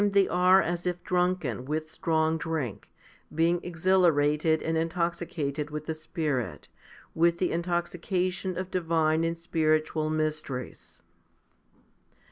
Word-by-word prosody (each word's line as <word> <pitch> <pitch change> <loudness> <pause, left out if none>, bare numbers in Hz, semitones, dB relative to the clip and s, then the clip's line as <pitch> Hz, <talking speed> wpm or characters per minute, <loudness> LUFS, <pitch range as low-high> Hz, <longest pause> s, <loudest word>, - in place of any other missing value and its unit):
HOMILY 205 -1 +2
XVIII - - -3
155 180 0 +1
are 185 -2 +5
as 175 +1 -4
if 175 0 -3
drunken 180 - 0
with 155 +2 -3
strong 160 0 +1
drink, 155 -9 -4 0.5
being 170 +2 +3
exhilarated 160 -3 +2
and 160 - -1
intoxicated 165 -3 -2
with 150 0 -5
the 160 - -2
Spirit, 155 - -3 0.4
with 170 +1 +3
the 180 0 0
intoxication 180 +1 -1
of 185 0 -4
divine 160 -2 +1
and 165 0 -1
spiritual 155 -2 0
mysteries. 155 -5 -3
165 Hz, 120 wpm, -28 LUFS, 155-175 Hz, 0.5 s, are